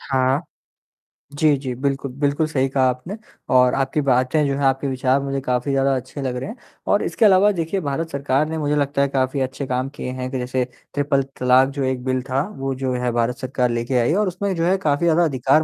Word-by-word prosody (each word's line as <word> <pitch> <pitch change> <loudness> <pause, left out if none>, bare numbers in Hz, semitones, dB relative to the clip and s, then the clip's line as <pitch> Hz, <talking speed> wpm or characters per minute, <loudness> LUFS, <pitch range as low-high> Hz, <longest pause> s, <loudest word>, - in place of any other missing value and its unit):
हाँ। 130 +3 +1 1.0
जी, 150 -1 +4
जी। 130 -2 -4
बिल्कुल, 135 +1 -2
बिल्कुल 145 +2 +1
सही 135 -3 0
कहा 130 0 +1
आपने 130 +11 -4 0.4
और 125 0 +5
आपकी 135 +2 0
बातें 135 +2 +2
जो 140 - 0
हैं, - - -3
आपके 135 +1 +1
विचार 130 0 +1
मुझे 140 0 -2
काफ़ी 125 +2 0
ज़्यादा 135 0 +2
अच्छे 130 +3 -6
लग 130 -2 -2
रहे 125 +11 -4
हैं 220 - -7 0.4
और 205 - +3
इसके 225 - +1
अलावा 200 0 +6
देखिए, 170 0 -2
भारत 155 +3 -2
सरकार 140 0 +1
ने 160 - -3
मुझे 150 -1 0
लगता 140 -1 0
है 140 - +3
काफ़ी 135 0 -1
अच्छे 130 +2 -3
काम 130 +1 -1
किए 125 - -5
हैं 125 0 -3
कि 130 - -2
जैसे 125 +1 -1 0.3
ट्रिपल 140 -1 +1 0.2
तलाक़, 130 +1 +4
जो 140 0 -3
एक 130 -1 -1
बिल 130 -1 0
था, 130 +2 +1 0.2
वो 135 0 -2
जो 130 0 -2
है 125 -1 -1
भारत 120 +1 0
सरकार 130 -2 -1
लेके 120 +2 -1
आई 120 +7 +2
और 210 - +1
उसमें 190 +2 -2
जो 165 -1 0
है 185 +2 +3
काफ़ी 150 -2 0
ज़्यादा 170 +1 +4
अधिकार 135 +1 +2
135 Hz, 225 wpm, -21 LUFS, 130-150 Hz, 1.0 s, अलावा